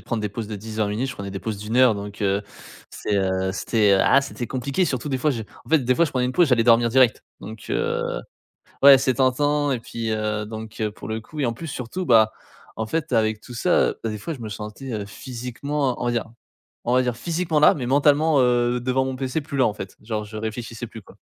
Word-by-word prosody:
prendre 115 - -2
des 105 - -1
pauses 105 +2 -5
de 105 - -6
10-20 110 +1 -3
minutes, 110 +6 -2
je - - -5
prenais 100 -1 -6
des 95 - -5
pauses 110 -2 -4
de 105 - -8
1 115 +3 -1
heure 125 -4 +6
donc 100 0 -8
heu, 100 0 +1 0.5
c'est 105 - -2
,heu, 95 -1 0
c'était 105 +1 +2
ah 135 - +5
c'était 140 -3 -5
compliqué. 135 +8 -1
Surtout 140 -3 -2
des 135 -2 -1
fois 150 +3 +2
j'ai 115 -3 -4 0.2
en - - -17
fait, 160 -2 +5
des 125 0 +2
fois, 170 - +5
je 155 - -3
prenais 125 -1 +1
une 125 - -2
pause 175 +5 +4
j'allais 125 -5 +3
dormir 115 0 +4
direct 130 -1 +3 0.2
donc 110 +1 -9
heu 470 +1 0 0.8
Ouais 140 -1 +10
c'est 130 0 +1
tentant. 145 +3 +2
Et 130 - 0
puis, 115 0 -5
heu, 105 -1 -1
donc 110 0 -8
heu, 105 - 0
pour - - -10
le 110 0 -3
coup, 150 +7 -10
et 140 - +1
en 120 - 0
plus, 165 +8 -8
surtout, 140 +7 -5
bah, 110 -5 +5 0.4
en 110 - -2
fait, 150 +4 -2
avec 110 -2 +2
tout 125 - -12
ça, 115 - +2
bah 115 - -1
des 105 - -4
fois 135 +11 -5
je 135 - -10
me 110 - -5
sentais 105 +1 -6
physiquement 125 +5 -3
on - - -1
va - - +1
dire 120 -2 -1 0.6
on 120 - +1
va 130 - +4
dire 125 -2 -1
physiquement 165 +2 -1
là, 150 - +7
mais 130 - -4
mentalement, 145 +2 +4
heu, 120 -1 +2
devant 130 +2 +1
mon 130 0 -3
PC 130 +3 -2
plus 140 0 -6
là, 130 - +5
en 105 - 0
fait, 95 -2 -8
genre, 110 -1 -3
je 105 +1 -9
réfléchissais 115 +2 -5
plus, 110 0 -10
quoi. - - -18
120 Hz, 250 wpm, -23 LUFS, 110-135 Hz, 0.8 s, Ouais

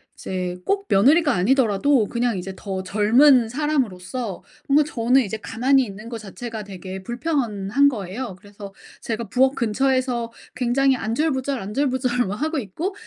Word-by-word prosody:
이제 180 -1 -4
꼭 400 0 0
며느리가 290 - +4
아니더라도 230 +3 +2
그냥 235 -3 -1
이제 185 +1 -5
더 190 -2 -5
젊은 230 +6 +4
사람으로서 240 -6 -2 0.2
뭔가 290 +2 +5
저는 255 -2 +2
이제 220 -2 -4
가만히 255 +5 +1
있는 210 +2 -9
것 235 - -5
자체가 220 +1 -7
되게 190 -1 -8
불편한 240 - 0
거예요. 215 -2 -4
그래서 200 +1 -12 0.3
제가 225 -2 -4
부엌 260 +5 +3
근처에서 250 0 0 0.2
굉장히 255 +2 +2
안절부절, 265 +3 -1
안절부절 250 +2 -1
막 195 - -3
하고 310 +7 -2
있고 300 - -4
235 Hz, 340 characters per minute, -22 LUFS, 205-270 Hz, 0.3 s, 뭔가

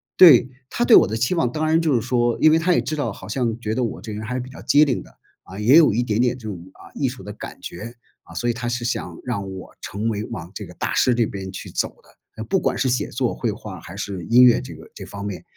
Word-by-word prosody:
对， 135 -8 +8 0.2
他 240 - 0
对 235 - +7
我 - - +7
的 110 - -3
期 120 +8 +1
望， 130 -9 +1
当 155 +4 -1
然 160 +1 +3
就 155 -5 +2
是 120 - +2
说， 120 0 +1
因 155 - +6
为 160 - +4
他 180 +2 +2
也 - - +2
知 155 - -3
道， 145 - -2
好 - - -11
像 120 -4 -2
觉 110 -2 -3
得 125 - 0
我 115 - -4
这 110 - -7
人 105 - -5
还 115 +3 -4
是 - - -1
比 125 +1 -7
较 130 - -11
机 150 +1 +5
灵 130 -4 -1
的， - - -17 0.3
啊， 95 - -11
也 115 +7 +5
有 165 -3 +6
一 120 +3 +1
点 110 -1 0
点 125 0 +1
这 115 -4 -9
种， 100 -4 -5 0.2
啊， - - -16
艺 135 - -1
术 125 -5 -10
的 105 +2 -7
感 - - -9
觉， 115 +7 -8 0.3
啊， - - -16
所 120 - -2
以 120 - +2
他 120 0 -4
是 120 0 -3
想 120 - -3
让 100 -6 -4
我 95 -1 -10
成 105 +3 -3
为 105 -1 -2
往 90 -8 -7
这 - - -7
个 - - -12
大 - - -3
师 125 - +3
这 120 -1 +2
边 95 -2 -6
去 95 - -8
走 - - -1
的， - - -23 0.3
呃， 110 - -4
不 190 - 0
管 - - -1
是 135 - +1
写 125 - 0
作、 - - -1
绘 - - -2
画 - - -9
还 95 - -10
是 100 -3 -5
音 120 +6 +6
乐 125 -2 +6
这 - - -9
个 - - -13
这 - - -9
方 100 0 -8
面。 100 -3 -5
120 Hz, 320 characters per minute, -22 LUFS, 105-130 Hz, 0.3 s, 对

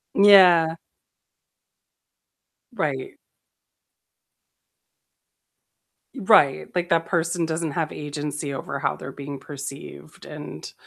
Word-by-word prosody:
Yeah. 180 -5 +6 2.0
Right. - - -3 3.0
Right, 195 - +3
like, 175 -1 -1
that 165 -2 +1
person 170 -1 -1
doesn't 160 -1 -3
have 160 0 -2
agency 145 -1 -5
over 140 0 -5
how - - -1
they're 135 - -9
being 140 0 -8
perceived, 135 - -10
and - - -9
160 Hz, 85 wpm, -23 LUFS, 140-175 Hz, 3.0 s, Yeah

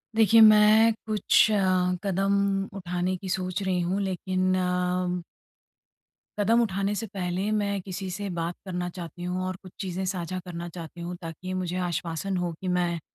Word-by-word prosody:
देखिए, 225 0 +6
मैं 215 +1 +7
कुछ 215 0 +4
अ, - - +3 0.5
कदम 195 0 +1 0.4
उठाने 180 0 -2
की 190 +1 -7
सोच 185 +1 -2
रही 185 -2 0
हूँ। 180 +3 0
लेकिन 185 -1 0
अ 180 0 0 1.2
कदम 225 +3 +3
उठाने 200 -2 0
से 225 +2 -3
पहले 190 0 -2
मैं 200 -2 0
किसी 190 0 -5
से 200 +2 -4
बात 170 +1 -2
करना 180 -1 -3
चाहती 175 0 -8
हूँ 180 +1 -2
और 185 0 -3
कुछ 185 - -11
चीज़ें 190 -1 -3
साझा 185 -1 -3
करना 170 -1 -6
चाहती 170 0 -9
हूँ, 175 +1 -4
ताकि 170 +2 -6
मुझे 185 -1 -2
आश्वासन 175 +1 -2
हो 175 -1 -1
कि 190 - -4
मैं 170 -1 0
185 Hz, 165 wpm, -27 LUFS, 180-195 Hz, 1.2 s, मैं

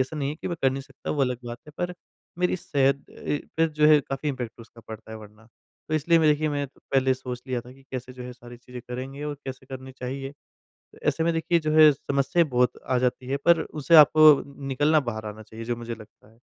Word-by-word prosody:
ऐसा 140 +4 -7
नहीं 140 -2 -1
है 150 - -3
कि - - -4
मैं 170 - -3
कर 135 - +4
नहीं 135 +1 -4
सकता 135 -1 -8
वो 145 - -1
अलग 125 -2 0
बात 120 0 -6
है। - - -11
पर 175 0 -2 0.4
मेरी 180 0 +1
सेहत 140 -4 +1
अ, - - -17 0.4
पे 165 0 +4
जो 150 0 +2
है 155 -1 +7
काफ़ी 135 +2 -4
इम्पैक्ट 125 -4 -5
उसका 115 0 -15
पड़ता 110 0 -9
है - - -6
वरना। 105 +1 -15 0.4
तो 155 - -1
इसलिए 165 +2 +3
मैं 155 -1 +4
देखिए 155 +1 +1
मैं 145 -1 -1
पहले 130 -1 +1
सोच 125 -1 -7
लिया 125 -2 -2
था 125 +2 -13
कि 135 +1 -19
कैसे 130 -1 -6
जो 125 0 -9
है 125 0 -7
सारी 120 0 -13
चीज़ें 125 0 -10
करेंगे 130 +3 -6
और 150 -1 -3
कैसे 130 0 -7
करनी 130 0 -8
चाहिए? 135 +2 -5
तो 145 - -25 0.5
ऐसे 160 - +1
में 170 - +2
देखिए 165 +1 +1
जो 155 -1 -1
है 155 -1 +9
समस्याएँ 140 +4 +1
बहुत 125 0 +1
आ 130 - +3
जाती 125 0 -1
हैं 140 - 0
पर 170 -1 +5
उसे 155 +2 +1
आपको 155 +1 +9 0.4
निकलना 150 +4 +3
बाहर 110 0 -7
आना 105 +1 -7
चाहिए 110 +2 -9
जो 120 +1 -1
मुझे 115 0 -6
लगता 110 0 -17
है। 115 - -25
135 Hz, 245 wpm, -25 LUFS, 125-150 Hz, 0.5 s, है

